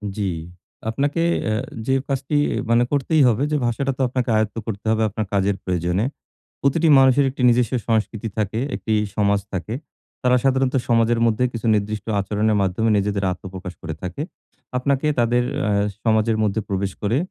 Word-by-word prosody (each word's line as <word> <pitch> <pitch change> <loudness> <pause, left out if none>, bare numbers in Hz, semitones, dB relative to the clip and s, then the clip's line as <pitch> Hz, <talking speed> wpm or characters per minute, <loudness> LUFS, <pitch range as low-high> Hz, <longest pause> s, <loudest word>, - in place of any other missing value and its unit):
জি। 105 - -3 0.7
আপনাকে 145 +7 0 0.2
অ্যা 110 - 0 0.3
যে 130 - +2
কাজটি 135 +1 -2 0.3
মানে 115 +1 +4
করতেই 145 +2 +2
হবে 120 +2 +2
যে, 150 - +2
ভাষাটা 135 +4 0
তো - - -2
আপনাকে 125 0 -2
আয়ত্ত 110 -2 0
করতে 105 -1 -5
হবে 110 0 +2
আপনার 110 +2 -3
কাজের 100 0 +2
প্রয়োজনে। 90 +3 0 0.6
প্রতিটি 160 +4 +2
মানুষের 135 +1 +5
১ - - -8
টি 125 - -1
নিজস্ব 120 -2 +2 0.2
সংস্কৃতি 110 0 0
থাকে, 110 +2 -1
১ - - -3
টি 110 - +3 0.2
সমাজ 100 -1 +2
থাকে। 95 +4 -3 0.5
তারা 125 0 +4
সাধারণত 135 -1 +2
সমাজের 115 0 +3
মধ্যে 115 +1 +2
কিছু 115 0 -3
নির্দিষ্ট 105 0 -2
আচরণের 105 +2 +1
মাধ্যমে 95 +4 +1
নিজেদের 100 0 -1
আত্মপ্রকাশ 90 0 -7
করে 80 0 -5
থাকে। 95 +11 -5 0.6
আপনাকে 140 +3 0
তাদের 120 +1 +2 0.3
আ - - +1 0.3
সমাজের 110 0 +2
মধ্যে 105 +1 0
প্রবেশ 100 0 -1
করে 110 +4 +1
110 Hz, 165 wpm, -22 LUFS, 100-125 Hz, 0.7 s, মানুষের